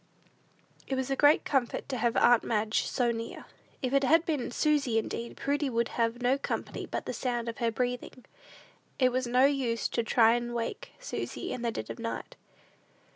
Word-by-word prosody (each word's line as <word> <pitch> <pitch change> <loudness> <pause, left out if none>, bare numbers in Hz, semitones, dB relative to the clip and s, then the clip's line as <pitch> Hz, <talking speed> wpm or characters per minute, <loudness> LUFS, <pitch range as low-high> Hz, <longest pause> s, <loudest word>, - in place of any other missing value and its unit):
It 270 - -1
was 265 +1 -2
a - - +2
great 290 +2 +5
comfort 265 -4 0
to 260 - -2
have 235 0 +1
aunt 240 -1 +5
Madge 215 -1 0
so 240 -2 +1
near. 230 0 -6 0.4
If 255 +1 -1
it 275 0 +4
had 325 +5 +4
been 295 -6 -1
Susy 275 -3 +1
instead, 230 +1 -3
Prudy 285 0 0
would 235 -1 0
have 230 -1 0
had 240 +1 -11
no 260 +3 +3
company - - -4
but - - -4
the - - -3
sound 240 -2 -2
of 230 - -5
her 235 - +2
breathing. 250 +2 -3 0.7
It 255 -2 +3
was 255 0 -1
of 240 - -6
no 255 +2 +6
use 255 -6 +1
to - - 0
try 230 0 +4
to 240 0 -5
wake 230 -1 -4
Susy - - -4
in 250 - -5
the 235 - 0
dead - - -5
of - - -9
night. 230 0 -5
245 Hz, 200 wpm, -29 LUFS, 230-270 Hz, 0.7 s, no